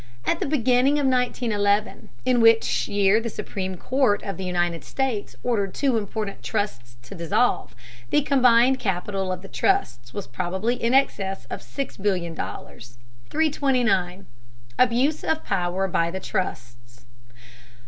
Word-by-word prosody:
At - - +1
the - - -1
beginning 260 -1 +3
of 290 - +1
1911, 230 -5 0 0.2
in 250 -2 +3
which 225 0 +4
year 205 +2 +3
the 230 - -3
Supreme 190 -3 -5
Court 255 -1 +1
of 195 - -4
the 190 - -5
United 175 -3 -1
States 250 - -3
ordered 205 -6 -1
two 270 -4 +1
important 210 -1 -3
trusts 120 - -3
to 130 - -10
dissolve, 170 +9 0 0.3
the 295 - +3
combined 255 -2 +4
capital 195 -1 -2
of 185 0 -5
the - - -9
trusts 120 -8 0
was 200 - -5
probably 190 - -2
in 240 0 0
excess 195 -8 +1
of - - -5
$6,000,000,000. 175 - -4 0.3
329. 250 - +1 0.5
ABUSE 255 +5 +2
OF 320 0 -1
POWER 190 0 0
BY 170 -2 +1
THE 190 +2 -4
TRUSTS. 120 -9 -5
205 Hz, 135 wpm, -24 LUFS, 180-250 Hz, 0.5 s, which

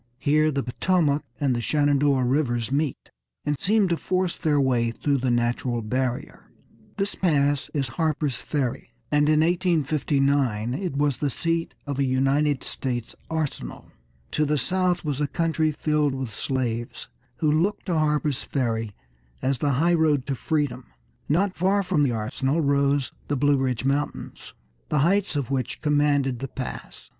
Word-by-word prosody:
Here 155 +3 +3
the 140 -2 -1
Potomac 150 +2 +1 0.2
and 135 -4 +1
the 120 - -1
Shenandoah 145 -1 +2
Rivers 125 -3 0
meet, 145 -1 -2 0.3
and 145 -1 -1
seem 210 0 +3
to 170 - +2
force 185 +1 -1
their 150 -2 +1
way 125 -4 +2
through 140 +4 0
the 130 0 0
natural 120 0 0
barrier. 130 +5 -3 0.5
This 200 0 -1
pass 145 -5 +1
is 140 -3 0
Harper's 150 0 -1
Ferry, 130 -5 -3 0.2
and 150 0 +3
in 155 0 +4
1859 140 - +1
it 175 -2 -3
was 145 -2 +1
the 145 - 0
seat 165 +4 -1
of 140 -1 -3
a - - +3
United 135 +2 +1
States 120 -3 -4
arsenal. 155 - -4 0.4
To 155 - +1
the 150 0 +1
south 180 +5 0
was 145 -1 -2
a 145 - +1
country 160 +1 0
filled 150 -2 0
with 130 -5 -5
slaves, 120 -1 -3 0.3
who 155 -2 +1
looked 170 +7 +1
to 180 - -1
Harper's 150 -3 +1
Ferry 115 -6 -2 0.5
as 130 -1 +1
the 145 -2 +1
highroad 155 -2 +2
to 140 - -2
freedom. 145 0 -1 0.4
Not 185 +6 +2
far 195 +3 +2
from 180 -5 +1
the 140 -3 +3
arsenal 125 +7 -1
rose 140 -1 +2 0.2
the 145 - 0
Blue 145 +1 +3
Ridge 130 -2 -1
Mountains, 140 +2 -3 0.3
the - - +1
heights 195 -1 +1
of 140 -3 -2
which 130 -2 -2
commanded 145 -4 +2
the 135 - -4
pass. 130 -2 -7
145 Hz, 155 wpm, -25 LUFS, 130-155 Hz, 0.5 s, in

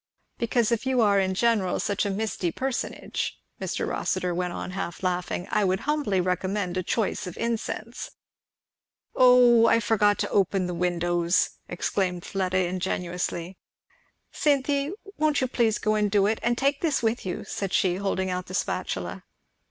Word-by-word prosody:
"Because 235 0 +1
if 235 +3 0
you 260 -1 +2
are 200 -2 +4
in 190 -1 0
general 215 -4 +2
such 205 0 0
a - - -1
misty 195 -3 -2
personage," 260 +4 -3 0.2
Mr. - - -2
Rossitur 180 -1 -1
went 180 0 -1
on 185 - -5
half 185 -1 -5
laughing, 180 -1 -1
"I 210 - +2
would 190 0 +1
humbly 290 -10 0
recommend 185 +1 -1
a 185 - 0
choice 205 +1 -1
of 180 - -8
incense." 230 0 -3 1.1
"O 245 -2 +7
I 230 - +5
forgot 210 -2 +3
to - - -1
open 195 -1 +2
the 180 - -3
windows!" 175 0 +1 0.2
exclaimed 180 0 -1
Fleda 185 -1 -1
ingenuously. 180 -1 -3 0.7
"Cynthy, 280 0 +1 0.3
won't 305 -1 +2
you 260 - +1
please 230 -3 +1
go 215 - 0
and 210 -1 +2
do 200 -1 +3
it? 215 +2 +1
And 235 0 +1
take 280 +2 +1
this 300 -7 +1
with 225 +2 0
you," 185 - -4
said 195 -2 -4
she, 185 -3 +2
holding 190 -1 -1
out 180 0 -3
the 185 - -5
spatula. - - -3
200 Hz, 160 wpm, -26 LUFS, 180-235 Hz, 1.1 s, O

